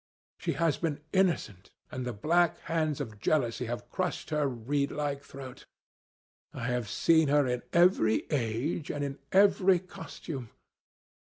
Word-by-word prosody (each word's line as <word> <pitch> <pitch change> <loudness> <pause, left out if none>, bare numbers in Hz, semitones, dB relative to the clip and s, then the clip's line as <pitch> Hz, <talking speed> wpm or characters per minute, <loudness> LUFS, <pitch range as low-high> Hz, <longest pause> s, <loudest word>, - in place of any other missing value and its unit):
She - - -1
has 165 -4 +1
been 155 -4 -2
innocent, 170 - +1 0.2
and 130 -1 -4
the - - -1
black 165 +10 +2
hands 155 -3 -1
of 110 -7 -6
jealousy 125 -2 +1
have 120 +1 -5
crushed 180 -3 -3
her 150 -2 +2
reedlike 140 +3 -2
throat. 135 -2 -10 0.9
I 120 - -4
have 125 -4 -1
seen 160 +7 +4
her 145 0 +4
in 125 -1 -1
every 170 - +4
age 135 +4 -1
and 145 - -2
in 140 0 -4
every 195 -1 +5
costume. 155 -7 -8
145 Hz, 140 wpm, -30 LUFS, 125-165 Hz, 0.9 s, every